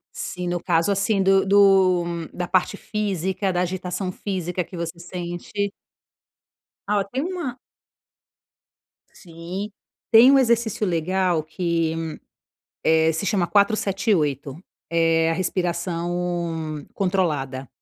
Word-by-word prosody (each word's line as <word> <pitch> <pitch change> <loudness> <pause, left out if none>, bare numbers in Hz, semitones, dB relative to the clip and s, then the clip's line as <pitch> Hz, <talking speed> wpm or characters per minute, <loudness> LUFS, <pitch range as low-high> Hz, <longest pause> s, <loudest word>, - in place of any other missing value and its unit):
Sim, 180 -1 -4
no 175 -1 -2
caso 170 +2 +2
assim 200 0 +1
do 195 0 +4
do 190 -3 +5 0.3
da 175 0 -3
parte 185 +2 +1
física, 195 -2 -2
da 180 - 0
agitação 185 +1 -2
física 180 -2 -3
que 185 - -11
você 170 0 -5
sente? 175 +3 -4 1.2
Ah, 210 - +3
ó, - - -1
tem 260 +7 -3
uma 340 -8 -4 1.5
Sim. 175 +4 -7 0.4
Tem 230 +3 +8
um 275 - +6
exercício 230 -4 +1
legal 180 0 +1
que, 165 0 -1 0.9
eh, 160 0 +4
se 165 +5 -3
chama 180 -2 +1
478. 195 - +1 0.3
É 165 -1 +3
a - - +1
respiração 170 -3 -2
controlada. 150 -9 -1
180 Hz, 110 wpm, -23 LUFS, 165-195 Hz, 1.5 s, Tem